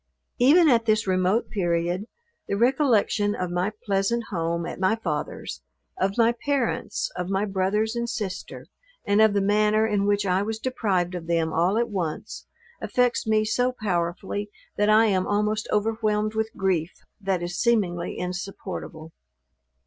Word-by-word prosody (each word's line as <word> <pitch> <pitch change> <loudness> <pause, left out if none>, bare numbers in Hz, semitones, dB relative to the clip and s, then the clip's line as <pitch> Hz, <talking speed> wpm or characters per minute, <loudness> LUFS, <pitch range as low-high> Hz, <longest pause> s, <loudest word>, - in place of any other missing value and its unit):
Even 310 +7 +6
at 235 -5 +4
this 215 0 +2
remote 185 +3 +1
period, 175 0 -1 0.4
the 200 - -1
recollection 230 -4 +2
of 180 -1 -3
my 180 +3 0
pleasant 200 +4 +1
home 170 -2 -1
at - - -6
my 190 +4 +2
father's, 150 - -4 0.3
of 195 +3 -1
my 230 0 +5
parents, 285 - -2
of 180 - -3
my 195 +1 +1
brothers 210 +3 0
and 235 0 -2
sister, 200 -5 -5 0.4
and 205 +1 +3
of 220 -2 +5
the 200 - +3
manner 210 +2 +3
in 205 -2 0
which 205 0 +1
I 185 0 +2
was 220 +2 -2
deprived 200 -8 -1
of 170 -2 -6
them 165 -1 0
all 175 +6 +2
at 235 0 +1
once, 175 -7 -4 0.3
affects 245 -2 +1
me 215 0 +3
so 245 +4 +1
powerfully, 190 +1 -2 0.3
that 210 +1 +2
I 215 +1 +6
am 190 -4 +1
almost 210 +1 0
overwhelmed 215 0 0
with 220 0 -1
grief, 185 -3 0 0.3
that 190 -3 -1
is 175 +1 -4
seemingly 190 -8 0
insupportable. 180 -3 -6
205 Hz, 155 wpm, -25 LUFS, 185-220 Hz, 0.4 s, Even